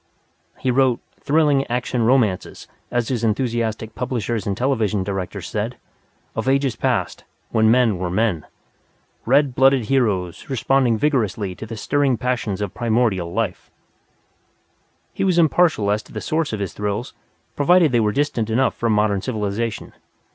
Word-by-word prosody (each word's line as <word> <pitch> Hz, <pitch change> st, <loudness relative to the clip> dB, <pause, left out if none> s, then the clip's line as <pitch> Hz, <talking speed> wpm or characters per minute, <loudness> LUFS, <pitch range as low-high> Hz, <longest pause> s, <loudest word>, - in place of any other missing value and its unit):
He 130 Hz, -, 0 dB
wrote 130 Hz, -1 st, +2 dB, 0.2 s
"thrilling 145 Hz, -2 st, +2 dB
action 125 Hz, 0 st, -1 dB
romances," 115 Hz, -5 st, +1 dB, 0.2 s
as 120 Hz, -2 st, -1 dB
his 120 Hz, -3 st, -2 dB
enthusiastic 115 Hz, -1 st, -1 dB
publishers 115 Hz, -3 st, -3 dB
and 100 Hz, 0 st, -1 dB
television 110 Hz, -7 st, 0 dB
directors 95 Hz, -2 st, -4 dB
said, -, -, -3 dB, 0.6 s
"of 115 Hz, +3 st, -1 dB
ages 135 Hz, -3 st, +1 dB
past, -, -, -1 dB, 0.3 s
when 110 Hz, 0 st, +3 dB
men 115 Hz, -5 st, +3 dB
were 90 Hz, -1 st, -2 dB
men. 95 Hz, -4 st, 0 dB, 0.8 s
Red 135 Hz, +1 st, +3 dB
blooded 135 Hz, -3 st, +3 dB
heroes 105 Hz, -, 0 dB
responding 130 Hz, -2 st, +2 dB
vigorously 110 Hz, -8 st, 0 dB
to 110 Hz, -, -9 dB
the 115 Hz, 0 st, -7 dB
stirring 140 Hz, +1 st, +1 dB
passions 115 Hz, -5 st, -2 dB
of 100 Hz, -3 st, -3 dB
primordial 110 Hz, -7 st, 0 dB
life!" 105 Hz, -2 st, -3 dB, 1.4 s
He -, -, -2 dB
was 185 Hz, -3 st, +2 dB
impartial 160 Hz, -10 st, +3 dB
as 105 Hz, +1 st, 0 dB
to -, -, -19 dB
the -, -, -5 dB
source 160 Hz, 0 st, -1 dB
of 110 Hz, -, -3 dB
his 100 Hz, -5 st, -3 dB
thrills 105 Hz, +4 st, -3 dB, 0.4 s
provided 170 Hz, +1 st, +4 dB
they 120 Hz, -, +3 dB
were 105 Hz, -2 st, +2 dB
distant 120 Hz, -3 st, -1 dB
enough 125 Hz, +2 st, +2 dB
from 115 Hz, -2 st, 0 dB
modern 105 Hz, -2 st, +1 dB
civilization. 110 Hz, -1 st, -3 dB
115 Hz, 145 wpm, -21 LUFS, 105-135 Hz, 1.4 s, provided